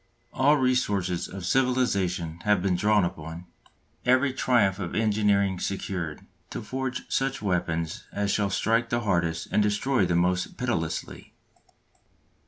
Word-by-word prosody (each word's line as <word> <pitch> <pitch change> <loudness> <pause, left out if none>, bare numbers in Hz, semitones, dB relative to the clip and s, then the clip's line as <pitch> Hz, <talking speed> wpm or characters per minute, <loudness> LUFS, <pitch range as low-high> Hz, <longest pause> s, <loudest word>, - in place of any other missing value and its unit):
All 145 +4 +4
resources 105 -9 0
of 95 -2 -7
civilisation 95 -9 +1
have 105 -3 +2
been 95 -2 +2
drawn 105 +1 +3
upon, 85 0 -6 0.6
every 130 +2 +3
triumph 110 -7 +2
of 90 -3 -4
engineering 105 -3 +2
secured, 90 -5 -4 0.2
to - - -6
forge 130 +3 -3
such 135 0 -1
weapons 85 -4 -2
as 100 0 -1
shall 100 -1 +1
strike 115 +4 +1
the 120 0 0
hardest 85 -5 0
and - - +3
destroy 105 +1 +1
the 90 - +1
most 90 +1 0
pitilessly. 110 -11 -3
100 Hz, 130 wpm, -26 LUFS, 90-120 Hz, 0.6 s, All